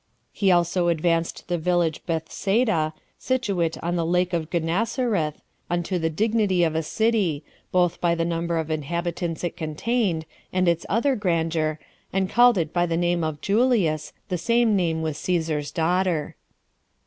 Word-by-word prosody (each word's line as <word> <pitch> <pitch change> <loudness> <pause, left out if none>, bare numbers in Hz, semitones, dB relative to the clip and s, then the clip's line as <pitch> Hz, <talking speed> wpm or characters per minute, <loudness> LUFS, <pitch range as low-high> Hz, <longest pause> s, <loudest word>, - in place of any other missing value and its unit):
He 195 -2 +2
also 175 0 +2
advanced 165 0 0
the 175 -1 -1
village 170 -1 0
Bethsaida, 165 +1 0 0.2
situate 195 -11 0
at 175 +1 -1
the 170 - 0
lake 180 +2 +1
of 165 -2 -1
Gennesareth, 180 - -1 0.3
unto 175 +1 -1
the 160 0 0
dignity 205 0 +1
of 160 -2 +1
a 160 - 0
city, 195 -4 0 0.3
both 180 -2 +1
by 170 -1 +2
the 165 0 0
number 170 0 -1
of 160 -1 -2
inhabitants 170 +2 -3
it 175 - -2
contained, 170 +2 -1 0.3
and 185 -1 +1
its 170 0 +1
other 255 +6 +2
grandeur, 165 -5 0 0.3
and 190 0 0
called 240 -2 +6
it 165 -2 -1
by 175 0 +2
the 165 -1 0
name 175 -1 +1
of 155 -2 -3
Julias, 200 - +1 0.2
the 180 - -1
same 230 +3 +3
name 165 -4 0
with 155 -2 -2
Cæsar's 160 -5 -1
daughter. 170 0 0
175 Hz, 155 wpm, -24 LUFS, 160-190 Hz, 0.3 s, called